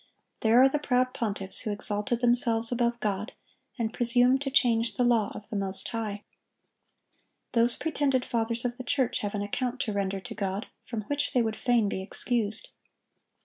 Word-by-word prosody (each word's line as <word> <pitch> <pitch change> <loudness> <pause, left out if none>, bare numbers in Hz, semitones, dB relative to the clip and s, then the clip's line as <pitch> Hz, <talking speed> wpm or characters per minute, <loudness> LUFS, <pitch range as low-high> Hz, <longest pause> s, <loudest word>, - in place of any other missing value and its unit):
There 225 +2 +4
are 265 - +8
the 295 +2 0
proud 255 -3 +1
pontiffs 200 -4 -2
who 215 - -2
exalted 205 +3 -1
themselves 235 -2 +3
above 240 -1 0
God, 210 0 -2 0.4
and 225 -2 -2
presumed 245 +2 +3
to 280 - -2
change 235 -4 +2
the 250 - +1
law 235 -4 +2
of 210 - -9
the - - -5
Most 195 -1 -2
High. 210 -3 -4 1.3
Those 235 0 +3
pretended 275 -5 0
fathers 230 0 -1
of 240 0 -2
the 255 - -6
church 255 0 0
have 205 0 -3
an 205 - -1
account 250 +5 -2
to 215 - -2
render 195 -1 -1
to - - -8
God 200 +2 -3 0.2
from 230 -3 -4
which 285 +6 -2
they 245 - +3
would 220 -1 -2
fain 240 -4 +2
be 190 - -3
excused. 220 +2 -1
230 Hz, 180 wpm, -28 LUFS, 210-250 Hz, 1.3 s, are